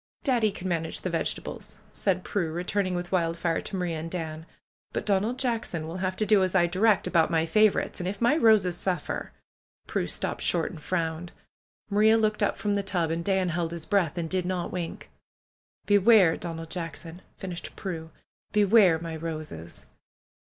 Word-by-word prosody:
"Daddy 235 -6 +2
can 190 -1 -6
manage 165 -2 -2
the 185 - -3
vegetables," 165 - -4 0.2
said 185 -2 0
Prue, 175 -6 -1
re 175 +2 -3
turning 185 -1 -1
with 175 0 -4
Wildfire 170 -2 0
to - - -6
Maria 175 -3 -2
and 165 +1 -5
Dan. 160 -2 -5 0.5
"But - - -2
Donald 210 +4 +1
Jackson 230 -10 -2
will 165 +3 -5
have 185 0 -2
to 215 - 0
do 205 -1 +5
as 185 0 0
I 175 -2 +5
direct 195 +5 +2
about 170 -3 +3
my 165 -1 +2
favorites, 215 +5 +2
and 180 0 -2
if 195 +1 -6
my 240 +5 +4
roses 215 - +4
suffer 175 -3 -3 0.3
" - - -48
Prue - - -1
stopped - - -2
short 170 -2 +2
and 160 - -10
frowned. 165 +1 -2 0.6
Maria 215 +2 +5
looked 215 -1 +1
up 205 - +1
from 205 +1 -1
the 200 - +1
tub 180 -5 -1
and 165 +1 -2
Dan 190 -1 +1
held 170 0 -1
his 170 -2 -5
breath 185 -5 +1
and 170 -1 -2
did 185 +1 -1
not 180 -2 -2
wink. 175 -2 -5 0.7
"Beware, 205 -4 +5
Donald 165 -1 -6
Jackson 165 0 -6
!" - - -37
finished 180 -2 -7
Prue. 165 -4 -5 0.4
"Beware 205 -4 +5
my 165 0 -6
roses 155 - -6
180 Hz, 185 wpm, -27 LUFS, 165-200 Hz, 0.7 s, do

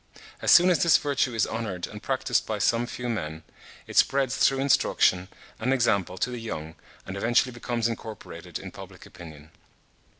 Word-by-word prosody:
As - - 0
soon 180 +1 +7
as 170 - +2
this 170 - +6
virtue 135 -4 -1
is 110 - +2
honoured 105 -6 -4
and - - -10
practised - - 0
by - - -2
some 120 +1 +1
few 125 0 -6
men, 80 -9 -4 0.4
it - - -7
spreads 135 -2 +3
through 135 - +3
instruction 95 -8 +2 0.3
and 125 +4 0
example 100 -8 +1
to 120 +6 -1
the 120 -2 -6
young, 80 -8 -6 0.3
and 95 - -6
eventually 120 +5 +2
becomes 120 -1 -2
incorporated 110 -1 -7
in - - -9
public - - -12
opinion. 80 -4 -13
115 Hz, 170 wpm, -26 LUFS, 95-125 Hz, 0.4 s, soon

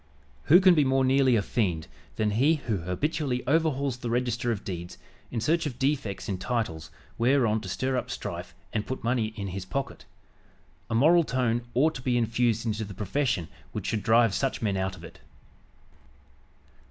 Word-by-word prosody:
Who 175 +5 +8
can 185 -1 +6
be 155 -3 +4
more 135 0 +2
nearly 130 -1 +4
a 105 - +2
fiend 90 -10 -1 0.3
than 105 -1 0
he 135 +10 +3
who 115 -8 -2
habitually 125 - -2
overhauls 140 -3 +1
the 120 -1 -5
register 120 0 0
of 105 -3 -3
deeds 90 -1 -6 0.3
in 120 - -3
search 160 +7 +1
of 125 -5 -6
defects 135 -7 -1
in 95 -3 -3
titles 95 -10 -2 0.3
whereon 115 -3 +3
to 95 - -7
stir 130 +8 -1
up - - -3
strife - - -6 0.2
and 105 - -2
put 130 - -5
money 120 -1 +1
in 100 -3 -4
his 95 +1 -5
pocket. 135 +8 -4 0.8
A 115 - -1
moral 165 +8 +5
tone 125 -4 0
ought 155 +5 +3
to 135 - -7
be 125 -1 +1
infused 115 0 +1
into 110 -1 -1
the 100 -2 -8
profession 105 - -1 0.3
which - - -4
should 110 - -1
drive 115 -1 +4
such 135 +6 -1
men 105 -3 0
out 95 0 -2
of 85 - -14
it." - - -12
120 Hz, 180 wpm, -27 LUFS, 105-135 Hz, 0.8 s, Who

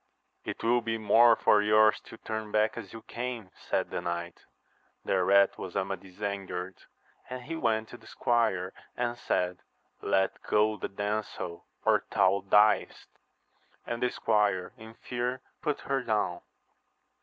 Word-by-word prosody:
It - - -5
will 120 +1 +3
be 115 0 -2
more 115 +2 +6
for 105 -1 +4
yours 105 +1 +5
to 115 - -11
turn 110 -1 -5
back 110 +1 +2
as 110 -5 -8
you 115 -1 -10
came, 120 -5 -5
said - - -2
the - - -2
knight. 85 0 -5 0.3
— - - -40
Thereat 100 +1 +3
was 90 - -7
Amadis 95 0 -4
angered: 95 -2 -4 0.5
and 125 -1 -6
he 165 +6 -5
went 110 -7 0
to 120 - -10
the - - -18
squire 110 -6 0 0.2
and 120 -1 -1
said, 90 -6 -1 0.4
Let 95 0 +1
go 105 +1 +2
the - - -5
damsel, 100 -3 -4 0.2
or - - +4
thou 95 +1 +3
diest! 105 +1 +3 0.8
and 120 0 -4
the 125 - +2
squire 105 -6 +1
in 110 -2 -12
fear 125 +1 -3 0.2
put 150 -3 -1
her 135 0 -1
down. 105 -7 -1
110 Hz, 150 wpm, -29 LUFS, 95-115 Hz, 0.8 s, more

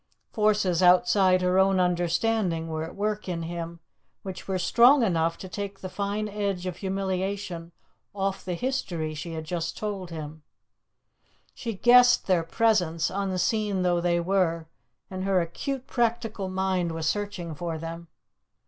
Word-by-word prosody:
Forces 210 -5 +2
outside 185 +1 +5
her 180 +1 +3
own 190 0 +4
understanding 175 0 +1
were 160 0 -3
at 160 - -8
work 210 0 -2
in 170 -2 -3
him 170 0 -6 0.4
which 190 -2 -7
were 190 -1 0
strong 240 +9 +5
enough 165 -4 +1
to 190 - -8
take 200 +1 -6
the 185 - -5
fine 205 +2 -2
edge 200 -3 -2
of 180 -1 -4
humiliation 190 -2 -3 0.4
off 195 -1 -2
the 180 -2 -3
history 170 -9 -2
she 160 +2 -6
had 160 -1 -4
just 170 +1 -3
told 200 -4 -4
him; 155 -1 -7 1.1
she 230 -2 -5
guessed 245 +3 +6
their 185 -3 +3
presence, 170 -3 +1
unseen 195 +1 0
though 175 -1 +2
they 175 0 +2
were, 170 -2 +1 0.5
and 185 0 -4
her 195 -1 +2
acute 255 - -3
practical 225 -5 -1
mind 185 -2 0
was 160 -1 -2
searching 200 -4 -2
for 165 +1 -4
them. 165 +1 -7
185 Hz, 150 wpm, -26 LUFS, 170-205 Hz, 1.1 s, guessed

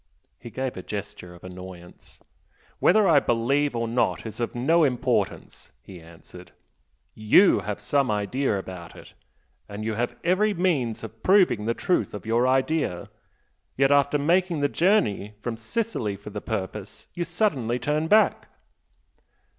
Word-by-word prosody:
He 120 - -10
gave 130 +2 -4
a 95 - -6
gesture 95 -3 -7
of 85 - -17
annoyance. 90 -1 -12 0.6
"Whether 215 -2 +4
I 155 -4 +6
believe 135 +4 0
or 115 0 -1
not 120 +1 0
is 110 - -7
of 120 - -3
no 160 +8 +3
importance," 125 -3 -1
he 90 -3 -12
answered 85 +2 -15 0.6
"YOU 110 - +4
have 105 -1 -5
some 135 +5 0
idea 105 +3 -1
about 90 -3 -8
it, - - -14 0.6
and 105 +1 -6
you 110 - -1
have 120 +3 -2
every 200 +4 +2
means 145 -12 0
of 115 0 -10
proving 185 - +3
the 115 +1 0
truth 180 - -1
of 105 - -8
your 115 +3 +2
idea 130 - 0 0.7
yet, 135 +1 +3
after 145 +1 +3
making 170 +2 +1
the 145 - +3
journey 110 - +1
from 115 +1 -4
Sicily 115 - -3
for 100 +2 -11
the 105 0 -6
purpose, 105 -1 -5
you 175 - -2
suddenly 165 - -1
turn 150 +6 -1
back!" 215 +4 +3
120 Hz, 150 wpm, -25 LUFS, 105-150 Hz, 0.7 s, I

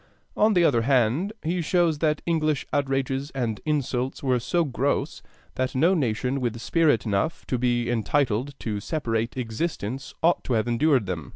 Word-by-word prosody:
On 215 0 +3
the 175 - +5
other 125 -8 +3
hand, 130 - +2
he 170 +2 -1
shows 170 -2 +1
that 150 -1 0
English 155 -4 0
outrages 135 0 0
and 115 -5 -2
insults 135 -3 -1
were 130 -2 +2
so 170 +8 +1
gross 140 +1 -1 0.3
that 130 0 -2
no 165 +8 +4
nation 130 - 0
with 115 -2 -2
spirit 150 0 +2
enough 105 +9 -1
to 125 - -2
be 120 -1 +1
entitled 120 +2 0
to 105 -2 -2
separate 115 -2 -2
existence 125 0 -4
ought 170 +2 +3
to 130 - -1
have 110 0 +1
endured 125 0 +2
them. 85 -5 -5
130 Hz, 165 wpm, -25 LUFS, 120-155 Hz, 0.3 s, the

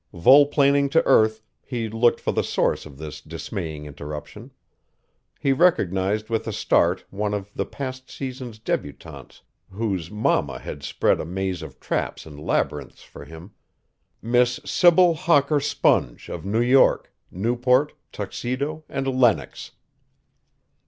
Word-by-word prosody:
Volplaning 140 - +5
to 165 +4 +2
earth, 110 0 +3 0.2
he 120 -3 -4
looked 115 +2 +2
for - - -1
the - - 0
source - - -1
of 70 -2 -14
this 75 0 -8
dismaying 80 -5 -6
interruption. 75 0 -8 0.9
He 135 - +2
recognized 105 - +1
with 115 -1 -2
a - - -2
start - - +1
one 105 +1 -2
of 100 0 -6
the - - -3
past 130 -1 -7
season's 130 -4 -7
débutantes 75 -9 -6 0.3
whose 95 -5 -3
mamma 75 - 0
had 70 - -8
spread 70 - +1
a - - -5
maze 95 0 -3
of - - -10
traps - - -3
and 75 -2 -11
labyrinths 75 - -2
for - - -12
him 80 +5 -12 0.7
Miss 120 +1 +2
Sybil 175 0 +5
Hawker 150 -2 +2
Sponge 100 - 0
of 85 - -6
New 110 +4 0
York, 125 +3 +3 0.2
Newport, 125 +8 +1 0.2
Tuxedo 130 +9 -4
and 135 -1 -3
Lenox. 125 -4 +1
115 Hz, 130 wpm, -23 LUFS, 95-135 Hz, 0.9 s, Volplaning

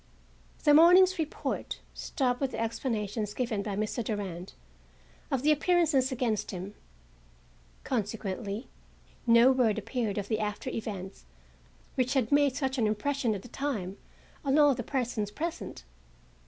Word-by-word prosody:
The 295 - +6
morning's 360 +4 +7
report 310 -1 -3
stopped 250 -2 -1
with 270 -2 -1
the - - -4
explanations 220 -2 -2
given 235 -5 -1
by 200 -1 -3
Mr. 215 +3 -2
Durand 195 -5 -4 0.8
of 270 -1 -1
the 305 - +5
appearances 305 -4 +3
against 230 -5 -1
him. 190 +1 -6 1.1
Consequently 210 -1 -3 0.6
no 235 +2 +7
word 245 -5 +2
appeared 220 -1 -2
of 200 -1 -2
the 220 0 0
after 210 -1 -3
events 190 - -6 0.7
which 255 +1 0
had 250 -5 +1
made 285 -2 +4
such 270 -2 -1
an 220 - +3
impression 235 +2 0
at 195 - -7
the - - -10
time 220 -8 -3 0.5
on 275 0 +2
all 290 -2 +6
the 245 - -4
persons 240 -4 -2
present. 320 - -5
240 Hz, 140 wpm, -29 LUFS, 210-275 Hz, 1.1 s, morning's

